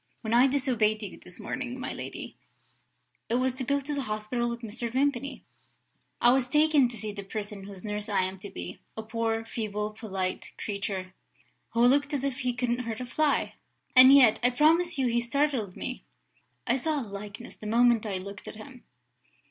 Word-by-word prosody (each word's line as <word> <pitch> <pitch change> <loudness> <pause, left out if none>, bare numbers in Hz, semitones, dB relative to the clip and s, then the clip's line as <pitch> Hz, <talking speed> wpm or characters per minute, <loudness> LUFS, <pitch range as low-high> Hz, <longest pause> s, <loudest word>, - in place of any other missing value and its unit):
When 220 -1 -2
I 245 +3 +7
disobeyed 240 -6 +1
you 200 - -7
this 180 - -13
morning, 255 -1 -4
my - - -4
lady, - - -7 0.9
it 230 - +1
was 255 0 +1
to 260 +1 -4
go 280 +3 +1
to 285 +2 -5
the 285 - -1
hospital 215 +1 -2
with 235 0 -5
Mr. 230 +1 -5
Vimpany. 275 +1 0 0.8
I 240 - +6
was 260 -1 +2
taken 300 -2 +4
to 235 - -9
see 215 0 -4
the 200 -1 -6
person 205 0 -6
whose 195 -1 -10
nurse 210 +1 -4
I 195 -2 +2
am 190 +1 -4
to 200 - -8
be. 90 - -7 0.2
A 220 - -4
poor, 225 0 -1
feeble, 210 -2 -3
polite 195 -4 -4
creature, 195 -2 -4 0.6
who 235 +1 +4
looked 285 +3 +3
as 275 - -2
if 275 -1 -2
he 250 -2 -1
couldn't 245 0 0
hurt 230 -3 -4
a 250 - -4
fly 300 +4 +1 0.4
and 255 +1 +10
yet 260 -6 +7
I 245 - +4
promise 320 +6 +3
you 265 - +1
he 240 -1 +2
startled 245 -6 0
me! 255 - -5 0.6
I 245 +1 +2
saw 305 +3 0
a - - -5
likeness, 205 +3 -8
the 215 - -8
moment 235 0 +4
I 195 -2 -2
looked 200 +1 -8
at - - -7
him." 250 +3 -12
235 Hz, 195 wpm, -28 LUFS, 210-260 Hz, 0.9 s, and